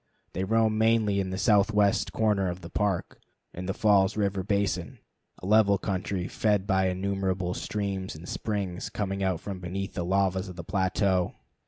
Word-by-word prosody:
They 95 - -2
roam 110 +1 +2
mainly 110 -3 +3
in 95 -1 -1
the 95 - -3
southwest 105 0 +3
corner 105 -4 +1
of 90 +1 -5
the 85 - -10
Park, 100 -4 -1 0.3
in 90 +1 -6
the 95 - -1
Falls 100 -1 +3
River 100 -2 0
Basin, 100 -2 -1 0.4
a - - -10
level 100 0 +5
country 95 -1 -2
fed 105 -3 +1
by 95 -2 +2
innumerable 95 -1 -1
streams 100 -3 -3
and 80 +3 -10
springs 100 -5 -3
coming 100 -1 -3
out 95 -3 0
from 100 -2 -6
beneath 95 +2 -4
the 90 - -2
lavas 95 +1 +1
of 90 - -9
the 85 - -7
plateau. 95 0 0
95 Hz, 170 wpm, -27 LUFS, 95-105 Hz, 0.4 s, level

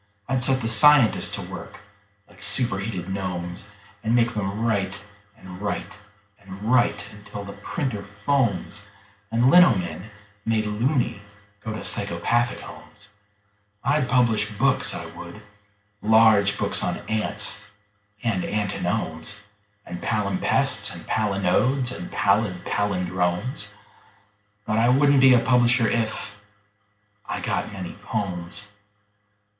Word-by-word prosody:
I'd 130 -1 0
set 130 0 +2
the 115 - -2
scientists 120 +2 +5
to - - -6
work - - -9 0.5
like - - -19
superheated 105 -4 +1
gnomes, 90 -1 -4 0.4
And 115 +1 +2
make 120 0 +3
them 105 +1 -2
write 100 -3 -1 0.3
and 95 -2 -11
write 105 0 -4 0.4
and 100 0 -11
write 120 +2 +2
until 105 0 -9
the 100 - -8
printer 105 +1 -3
foams 105 0 -1 0.4
And 120 +3 +3
lino 175 -10 +7
men, 90 +2 -5 0.3
made 110 -1 +1
"loony", 120 +1 0 0.4
go 110 - -4
to 105 - -6
psychopathic 105 +5 0
homes. 105 0 -13 0.7
I'd 140 -1 +1
publish 115 -4 +2
books, 130 +6 +1
I - - -5
would 85 +4 -10 0.6
large 110 -2 +5
books - - -2
on - - -1
ants 105 -1 -2 0.6
and 115 -6 0
antinomes 100 -2 -2 0.4
And 90 - -7
palimpsests 100 -4 0
and - - -9
palinodes 110 +5 +1
and 90 - -7
pallid 100 -3 +1
pallindromes: 90 - -1 1.0
But 110 +1 +1
I 120 +2 +4
wouldn't 140 +1 +5
be 130 -1 +8
a - - +5
publisher 120 -1 +3
if.... 110 -2 -2 0.9
I - - -3
got - - -2
many 95 -3 -6
"pomes." 100 -1 -4
105 Hz, 120 wpm, -24 LUFS, 100-120 Hz, 1.0 s, be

